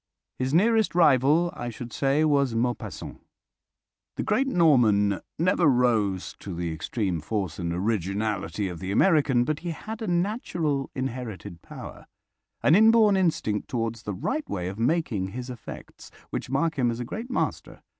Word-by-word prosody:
His 130 +1 -1
nearest 220 +5 +3
rival, 155 +1 +4
I 120 - -5
should 120 0 -8
say, 140 +3 +2
was 140 -5 +2
Maupassant. 115 -6 -3 0.9
The - - -2
great 270 +1 +1
Norman 115 - +4 0.2
never 175 0 +3
rose 115 -8 +1
to 95 -3 -7
the 85 -1 -3
extreme 90 +1 -2
force 95 -1 -3
and 85 -1 -2
originality 100 0 -1
of 90 -2 -6
the 95 +1 -4
American, 140 - +3
but 150 +3 -2
he 175 - -5
had 220 +7 -6
a 220 - -3
natural 175 - -1
inherited 120 -9 -5
power, - - -10 0.6
an 145 - +5
inborn 220 +1 +6
instinct 160 - 0
towards 115 -2 -3
the 105 -3 -5
right 300 - -3
way 90 -1 -3
of 100 +3 -8
making 120 - 0
his 125 +1 -5
effects, 120 - -10 0.2
which - - -4
mark 145 +3 0
him 120 -2 +3
as 115 0 -3
a 120 - -3
great 225 - -6
master. 255 - -3
125 Hz, 155 wpm, -26 LUFS, 105-165 Hz, 0.9 s, inborn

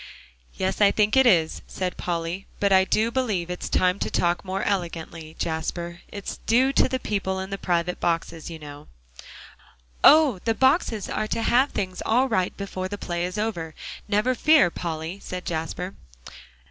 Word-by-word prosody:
"Yes, 190 +2 -2
I 205 - +7
think 210 +2 +2
it 265 -1 +6
is," 165 -7 +3
said 185 -1 -3
Polly, 170 +2 -3
"but 200 -1 +3
I 190 0 +6
do 220 +4 +1
believe 210 -9 -1
it's 180 - -5
time 185 +1 +2
to - - -2
talk 175 0 0
more 190 0 -3
elegantly, 165 -4 -3
Jasper. 170 +2 -3
It 200 -1 -7
is - - -4
due 260 +4 +4
to - - +3
the 260 - 0
people 195 -5 -2
in 190 +1 -6
the 195 - -4
private 175 0 -1
boxes, 165 -1 -2
you 165 - -7
know." 145 -1 -11 1.2
"Oh! 295 -9 +7
the 225 -1 +1
boxes 260 - +2
are 215 - -2
to 225 - -2
have 260 +5 +3
things 185 -2 -4
all 250 +4 +3
right 185 -7 0
before 190 -2 -4
the 205 +2 -5
play 175 -3 -3
is 180 +2 -5
over; 175 -8 -3 0.3
never 210 +4 +2
you - - -1
fear, 305 - +5
Polly," 165 +2 -5
said 180 0 -6
Jasper. 175 +3 -3
190 Hz, 180 wpm, -25 LUFS, 170-215 Hz, 1.2 s, I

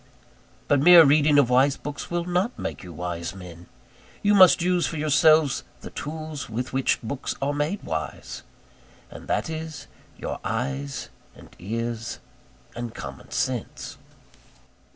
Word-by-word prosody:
But 145 - +3
mere 170 +1 +9
reading 145 +1 +4
of 130 -4 +4
wise 135 +3 +4
books 145 -1 -7
will 175 0 -2
not 180 +7 -1
make - - -5
you 90 - -10
wise 85 +1 -5
men: 90 -2 -11 0.6
you 205 0 +4
must 185 -3 +7
use 180 -1 +2
for 165 - -5
yourselves 155 -1 +4 0.2
the - - -9
tools 155 -2 -6
with 125 +4 -4
which 135 0 +1
books 125 +4 -4
are 140 +1 -1
made 150 +7 -2
wise; 80 -1 -5 0.7
and - - -11
that - - 0
is 160 -2 -6 0.3
your - - -5
eyes, 135 +5 -3 0.3
and - - -16
ears, 115 +4 -4 0.6
and 120 -1 -6
common - - -8
sense. - - -3
145 Hz, 140 wpm, -25 LUFS, 115-160 Hz, 0.7 s, mere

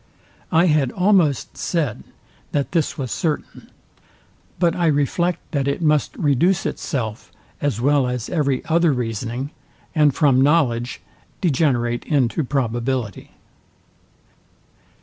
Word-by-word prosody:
I 165 +2 +4
had 150 -6 +2
almost 180 -7 +2
said, 165 -4 -2 0.5
that 140 -3 -1
this 165 -4 0
was 130 -4 -4
certain; 155 -4 -3 0.9
but 170 -1 +2
I 175 -2 +1
reflect 160 +4 0
that 140 -4 -1
it 140 - 0
must 150 -3 +1
reduce 165 +5 +2
itself, 115 -7 -4 0.3
as 140 -7 -1
well 140 +1 +3
as 125 -2 -3
every 140 -6 0
other 170 -1 +3
reasoning, 120 +3 -3 0.4
and 150 -4 +4
from 135 -2 +3
knowledge 130 -5 +1 0.4
degenerate 130 -8 +1
into 140 +1 +1
probability. 120 -4 -2
140 Hz, 110 wpm, -21 LUFS, 125-160 Hz, 0.9 s, I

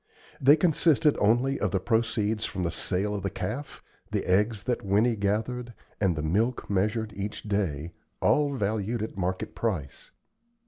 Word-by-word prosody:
They 140 +3 +7
consisted 155 -2 +3
only 120 +6 +2
of 105 - +1
the 95 - 0
proceeds 110 0 0
from 95 -4 -3
the 85 - 0
sale 95 +4 -1
of 100 - -3
the 100 - -1
calf, 135 +8 -5 0.3
the - - -1
eggs 105 +3 +2
that 125 +2 -1
Winnie 105 +4 +3
gathered, 110 +4 -2 0.2
and 95 -5 +2
the 75 - -3
milk 110 +10 0
measured 105 +2 0
each 100 +1 -5
day, 90 -7 -2 0.3
all 145 -2 +2
valued 110 0 -1
at 110 - -5
the 95 - -5
market 95 +4 -2
price. 90 -12 -3
105 Hz, 165 wpm, -27 LUFS, 95-120 Hz, 0.3 s, They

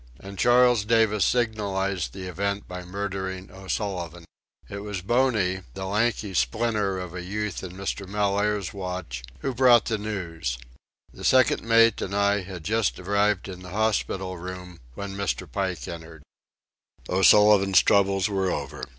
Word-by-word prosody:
And 100 +3 -10
Charles 120 0 +5
Davis 110 -2 +3
signalized 100 -6 -1
the 95 - -8
event 100 +3 -3
by 90 0 -7
murdering 95 0 -5
O'Sullivan. 95 -3 -4 0.4
It 100 - -6
was 100 -3 -5
Boney, 110 -5 +1
the 95 0 -5
lanky 105 0 0
splinter 100 - 0
of 90 -2 -7
a 90 - -5
youth 105 +2 -4
in 90 -1 -7
Mr. 100 +1 -4
Mellaire's 100 -1 0
watch, 90 -10 -5 0.2
who 135 - -2
brought 120 -2 +5
the 110 -2 -1
news. 85 - -4 0.6
The - - -11
second 130 -1 +4
mate 115 0 +4
and 100 - -3
I 100 0 +2
had 90 -3 -8
just 110 +3 0
arrived 100 +1 +1
in 90 -1 -8
the 90 - -10
hospital 95 -3 -1
room, 90 0 -8 0.2
when 100 -1 -6
Mr. 100 -2 -2
Pike 95 -3 -3
entered. 80 -2 -9 0.8
O'Sullivan's 100 +1 +5
troubles 100 -1 +3
were 95 -2 0
over. - - -4
100 Hz, 145 wpm, -25 LUFS, 90-105 Hz, 0.8 s, Charles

